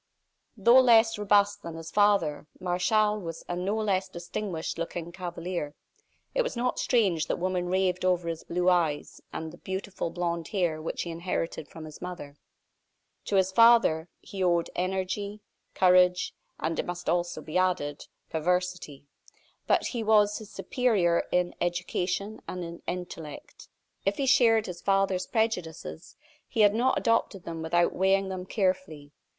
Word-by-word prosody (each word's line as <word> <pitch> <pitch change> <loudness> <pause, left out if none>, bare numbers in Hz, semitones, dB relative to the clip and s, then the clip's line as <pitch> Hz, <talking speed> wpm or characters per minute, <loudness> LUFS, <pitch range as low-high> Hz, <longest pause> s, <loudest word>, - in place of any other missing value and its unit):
Though 235 +5 +7
less 225 -3 +5
robust 205 0 +3
than 165 -1 -7
his 165 0 -8
father, 200 -8 +2
Martial 210 +4 +1
was 165 -4 -7
a 175 - -2
no 185 +4 -1
less 195 -3 0
distinguished 175 -1 -5
looking 170 0 -4
cavalier. 175 -4 -5 0.6
It - - +2
was 485 - -3
not 250 +1 0
strange 195 -10 +2
that - - -1
women 180 0 -1
raved 185 -1 +1
over 180 -2 +1
his 165 -1 -4
blue 180 +1 -1
eyes, 165 -5 +1
and 160 0 -6
the - - -13
beautiful 190 -2 -4
blond 170 -1 -2
hair 175 -6 -1
which 160 - -3
he 170 - -5
inherited 165 -2 -3
from 160 +1 -10
his 155 -1 -11
mother. 175 -6 -7 0.9
To 205 - -1
his 190 -1 +3
father 225 -7 +5
he 195 -2 -5
owed 170 -2 +2
energy, 190 +3 -2 0.3
courage, 180 0 +4 0.3
and, 160 0 -2
it - - -2
must 175 0 -5
also 175 +1 0
be 165 +3 -2
added, 175 -6 -1 0.2
perversity. 180 -3 -2 0.6
But - - +3
he 240 - -2
was 210 -1 +3
his 215 -2 -11
superior 200 -10 +1
in 180 0 +1
education 180 +4 -2
and 180 -1 -4
in 170 0 -8
intellect. 175 -4 -7 0.3
If 195 +1 0
he 275 - 0
shared 230 -4 +4
his 180 -2 -7
father's 195 -2 +1
prejudices, 180 -7 -3 0.3
he 225 - 0
had 205 -1 +6
not 250 +4 +2
adopted 230 -5 +1
them 165 -1 -6
without 170 +2 +2
weighing 195 +1 +2
them 185 -1 -5
carefully. 185 -8 -1
180 Hz, 155 wpm, -28 LUFS, 170-205 Hz, 0.9 s, Though